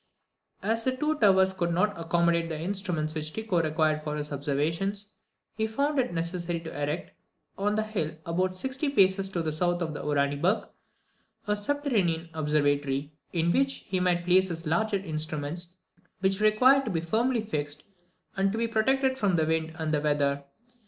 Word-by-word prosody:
As 225 Hz, +3 st, 0 dB
the 260 Hz, +1 st, 0 dB
two 305 Hz, +2 st, 0 dB
towers 190 Hz, -2 st, +5 dB
could 170 Hz, -2 st, -1 dB
not 205 Hz, +5 st, +1 dB
accommodate 170 Hz, 0 st, +1 dB
the 160 Hz, -2 st, -4 dB
instruments 175 Hz, -4 st, -2 dB
which 155 Hz, 0 st, -3 dB
Tycho 215 Hz, -6 st, 0 dB
required 155 Hz, -1 st, +1 dB
for 150 Hz, -1 st, -3 dB
his 150 Hz, 0 st, -4 dB
observations, 165 Hz, +9 st, -2 dB, 0.4 s
he 220 Hz, 0 st, -1 dB
found 280 Hz, +6 st, 0 dB
it 250 Hz, -, +1 dB
necessary 170 Hz, 0 st, -2 dB
to 160 Hz, -, -8 dB
erect, 145 Hz, +3 st, -3 dB, 0.4 s
on 205 Hz, +1 st, 0 dB
the 215 Hz, -, +1 dB
hill 180 Hz, -8 st, -3 dB
about 185 Hz, +2 st, 0 dB
sixty 265 Hz, +8 st, -2 dB
paces 195 Hz, -6 st, +3 dB
to 175 Hz, -3 st, -2 dB
the 155 Hz, -, -1 dB
south 175 Hz, +3 st, +1 dB
of 160 Hz, -, -3 dB
Uraniburg, 145 Hz, +6 st, 0 dB, 0.8 s
a 210 Hz, -, +1 dB
subterranean 205 Hz, -, 0 dB
observatory, 145 Hz, -2 st, 0 dB, 0.2 s
in 170 Hz, 0 st, +1 dB
which 270 Hz, +6 st, +1 dB
he 185 Hz, -1 st, 0 dB
might 175 Hz, -1 st, +1 dB
place 185 Hz, +1 st, +4 dB
his 170 Hz, -1 st, -5 dB
larger 210 Hz, +6 st, +1 dB
instruments, 160 Hz, 0 st, -3 dB, 0.5 s
which 195 Hz, +1 st, +1 dB
required 255 Hz, +6 st, +5 dB
to -, -, -2 dB
be 165 Hz, -5 st, -1 dB
firmly 230 Hz, +8 st, +1 dB
fixed, 150 Hz, -9 st, -3 dB, 0.5 s
and 195 Hz, 0 st, +2 dB
to 220 Hz, -, -3 dB
be 230 Hz, 0 st, +1 dB
protected 260 Hz, +4 st, +1 dB
from 200 Hz, -4 st, +2 dB
the 160 Hz, -2 st, +2 dB
wind 160 Hz, 0 st, -1 dB
and 160 Hz, -2 st, -2 dB
the 150 Hz, -, +2 dB
weather. 140 Hz, -1 st, +1 dB
175 Hz, 170 wpm, -28 LUFS, 155-210 Hz, 0.8 s, towers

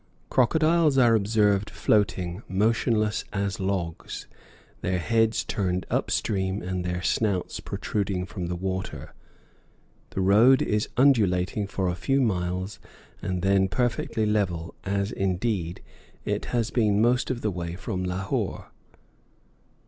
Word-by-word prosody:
Crocodiles 155 Hz, +3 st, +3 dB
are 120 Hz, -3 st, +6 dB
observed 105 Hz, -1 st, +2 dB
floating, 95 Hz, -3 st, 0 dB
motionless 110 Hz, +2 st, +1 dB
as 100 Hz, -1 st, -2 dB
logs, 95 Hz, -4 st, -3 dB, 0.6 s
their 90 Hz, +1 st, 0 dB
heads 115 Hz, +4 st, +1 dB
turned 90 Hz, -2 st, -1 dB
up -, -, 0 dB
stream 95 Hz, -1 st, 0 dB
and 90 Hz, 0 st, -3 dB
their 90 Hz, 0 st, -3 dB
snouts 100 Hz, -4 st, 0 dB
protruding 100 Hz, -3 st, -2 dB
from 90 Hz, -1 st, -5 dB
the 90 Hz, -, -2 dB
water. 95 Hz, +1 st, -4 dB, 1.0 s
The 95 Hz, -, -3 dB
road 110 Hz, +8 st, +5 dB
is 105 Hz, 0 st, 0 dB
undulating 105 Hz, -7 st, +3 dB
for 95 Hz, -1 st, -2 dB
a 90 Hz, -, 0 dB
few 135 Hz, +9 st, 0 dB
miles 95 Hz, -3 st, -1 dB, 0.4 s
and 90 Hz, -1 st, -3 dB
then 95 Hz, 0 st, +3 dB
perfectly 115 Hz, 0 st, -1 dB
level, 95 Hz, -6 st, -1 dB
as, 100 Hz, +1 st, -1 dB
indeed, 95 Hz, -3 st, -2 dB, 0.4 s
it -, -, -1 dB
has 115 Hz, -2 st, -1 dB
been 105 Hz, -4 st, +2 dB
most 120 Hz, +3 st, +2 dB
of 125 Hz, -2 st, -2 dB
the 105 Hz, -, 0 dB
way 85 Hz, -2 st, -4 dB
from 95 Hz, 0 st, -4 dB
Lahore. 90 Hz, +1 st, -3 dB
100 Hz, 125 wpm, -26 LUFS, 90-110 Hz, 1.0 s, are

